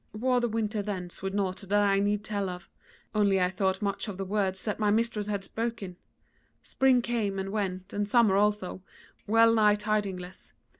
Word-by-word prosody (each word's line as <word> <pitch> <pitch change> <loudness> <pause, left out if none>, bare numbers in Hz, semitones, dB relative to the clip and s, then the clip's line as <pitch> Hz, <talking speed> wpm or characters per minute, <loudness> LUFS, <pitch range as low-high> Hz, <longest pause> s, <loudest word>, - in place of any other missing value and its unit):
"Wore 250 +3 +1
the 240 - 0
winter 215 -1 -1
thence 185 -4 -5
with 195 +1 -3
naught 190 -2 -1
that 205 +1 0
I 195 -1 +3
need 205 +1 0
tell 200 -2 -2
of, 180 -1 -9 0.4
only 200 -3 +3
I 180 0 +1
thought 190 +1 -1
much 200 +1 -2
of 200 -3 -6
the 195 - -3
words 190 -1 -1
that 210 -1 -2
my 210 -1 +2
mistress 215 -1 0
had 200 -2 -2
spoken. 220 -4 -4 0.7
Spring 260 -2 +3
came 220 -5 -1
and 195 0 -3
went, 190 -3 -3
and 205 0 -1
summer 225 -4 +4
also, 205 -2 0 0.5
well 225 +2 +5
nigh 210 -2 +4
tidingless. 205 -4 -3
205 Hz, 185 wpm, -28 LUFS, 195-215 Hz, 0.7 s, well